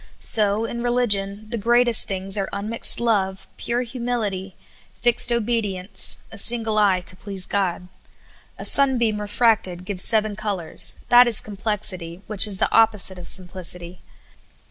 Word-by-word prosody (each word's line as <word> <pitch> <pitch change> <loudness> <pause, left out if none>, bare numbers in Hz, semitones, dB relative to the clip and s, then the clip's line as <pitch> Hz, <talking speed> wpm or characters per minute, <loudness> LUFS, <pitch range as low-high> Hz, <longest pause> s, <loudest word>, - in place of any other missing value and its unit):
So, 210 0 +2
in 235 +1 -6
religion, 215 -4 -1
the 235 - -3
greatest 240 +1 +2
things 190 0 -3
are 195 -2 -2
unmixed 210 +3 +1
love, 195 -5 -1
pure 240 +1 -2
humility, 230 -6 -4 0.4
fixed 240 0 +3
obedience, 215 -5 -1
a 220 - -2
single 225 -1 +1
eye 195 -3 +2
to 180 +1 -3
please 195 -1 -3
God. 185 -3 -3 0.7
A - - -5
sunbeam 240 -6 +3
refracted 205 -4 0
gives 185 -2 +5
seven 215 -2 +1
colors; 185 -5 0
that 245 0 +6
is 230 -4 +5
complexit}^ 195 -4 -4
which 210 +1 +4
is 200 -2 -1
the - - -1
opposite 210 -4 +2
of 175 - -10
simplicity. 180 -1 -4
210 Hz, 140 wpm, -21 LUFS, 190-230 Hz, 0.7 s, that